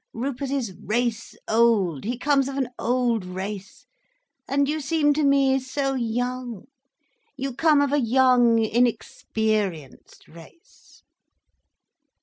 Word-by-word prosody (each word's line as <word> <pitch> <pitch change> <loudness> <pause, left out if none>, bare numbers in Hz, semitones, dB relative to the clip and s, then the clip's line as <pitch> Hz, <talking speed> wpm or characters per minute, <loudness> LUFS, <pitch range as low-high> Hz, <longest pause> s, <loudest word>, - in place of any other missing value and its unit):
Rupert 265 +3 -3
is 260 -8 -2
race 230 +1 -2
old, 215 - +2
he 240 +2 -2
comes 275 0 +1
of 275 - -6
an 260 -3 -1
old 240 -3 0
race—and 210 - -6
you 305 +2 -1
seem 295 0 +2
to 305 +1 0
me 275 -1 +3
so 270 +1 -2
young, 245 -2 -3 0.7
you 270 -1 -4
come 305 +1 +3
of 285 0 0
a 290 - +3
young, 245 -1 +4
inexperienced 220 - -2
race." 170 - -18
250 Hz, 115 wpm, -24 LUFS, 220-275 Hz, 0.7 s, young